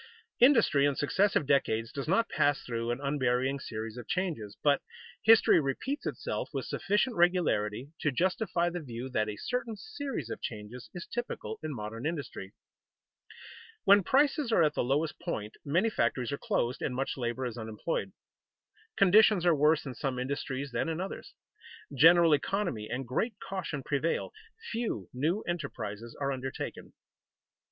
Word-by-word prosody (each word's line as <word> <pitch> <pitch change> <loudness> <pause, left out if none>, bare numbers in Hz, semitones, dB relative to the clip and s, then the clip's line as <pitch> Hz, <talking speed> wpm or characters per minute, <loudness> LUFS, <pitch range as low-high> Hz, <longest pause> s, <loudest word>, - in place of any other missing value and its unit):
_ - - -17 0.4
Industry 230 - +5
in 140 - 0
successive 190 +4 +2
decades 115 -5 +1
does 140 0 -5
not 195 +7 +3
pass 145 -1 +1
through 115 -1 -3
an 120 +2 -1
unvarying 135 -1 0
series 110 -1 -6
of 120 - -8
changes, 155 - -2
but 145 -1 +4 0.4
history 225 -4 +6
repeats 260 - -3
itself - - -3
with - - -2
sufficient 210 +5 0
regularity 145 - +1
to 150 - +1
justify 175 - 0
the 175 - -3
view 125 -4 -6
that 110 -4 0
a 105 - -5
certain 235 - -3
series 275 - -5
of - - -5
changes 110 +3 -7
is 175 - -6
typical 240 -2 -5
in 155 - -4
modern 115 +1 -4
industry. 145 - -5 1.3
When 200 +1 +7
prices 275 - +2
are 175 - +5
at 150 -1 +2
the - - 0
lowest 145 +5 0
point 110 - -4
many 175 +10 +1
factories 125 - 0
are 140 - -3
closed, 120 +2 -1
and 125 - -2
much 135 +2 -2
labor 125 0 -2
is 120 -3 -4
unemployed. 110 -2 -3 0.9
Conditions 200 -1 +6
are 175 - +6
worse 150 +1 +3
in 135 - -5
some 130 +1 -3
industries 135 +1 -3
than 120 +6 -1
in 165 0 -2
others. 190 +2 -6 0.6
General 165 +3 +7
economy 150 - -1
and 130 +2 -3
great 215 - -1
caution 165 -7 -4
prevail; 150 - -1 0.4
few 225 - -3
new 160 +11 0
enterprises 115 -9 -5
are 140 -1 0
undertaken. 130 0 -5
145 Hz, 155 wpm, -30 LUFS, 125-185 Hz, 1.3 s, When